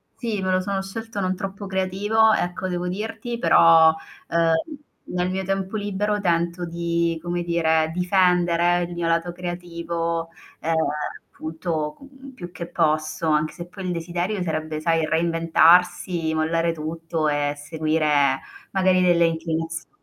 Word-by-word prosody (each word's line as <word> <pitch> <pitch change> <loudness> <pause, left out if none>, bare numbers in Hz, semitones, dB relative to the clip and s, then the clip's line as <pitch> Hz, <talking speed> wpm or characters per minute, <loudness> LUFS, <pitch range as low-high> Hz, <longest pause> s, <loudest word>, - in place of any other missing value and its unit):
sì, 220 -5 -3
me 185 0 0
lo 185 - +2
sono 195 +1 -2
scelto 225 +2 -6
non 185 -1 0
troppo 195 +1 -6
creativo, 200 +4 +2
ecco, 180 +1 -1
devo 180 -1 -2
dirti 225 +5 -4
però, 165 -7 +6 0.4
ehm, 165 -1 +3 0.5
nel 180 0 -2
mio 190 +1 -2
tempo 195 +1 -2
libero 205 0 -1
tento 170 0 0
di 170 -1 -1
come 175 0 -2
dire, 160 -2 +1
difendere 175 -1 +2
il 175 0 -5
mio 170 -1 -2
lato 170 +1 +1
creativo, 170 -1 -3 0.3
ehm, 165 - -1 0.6
appunto 160 -1 -3
co 275 - -14 0.3
più 175 -7 -9
che 170 -1 -7
posso, 155 -1 0
anche 155 0 +2
se 175 -1 -8
poi 190 +1 -8
il 180 - -1
desiderio 175 +4 -2
sarebbe, 155 -2 -3
sai, 165 0 +1
reinventarsi, 165 +1 +3
mollare 165 +1 +1
tutto 160 0 -3
e 145 -1 0
seguire 150 -2 +1 0.3
magari 185 -1 +3
delle 175 -2 +4
inclinazio 165 0 -3
170 Hz, 140 wpm, -23 LUFS, 165-185 Hz, 0.6 s, però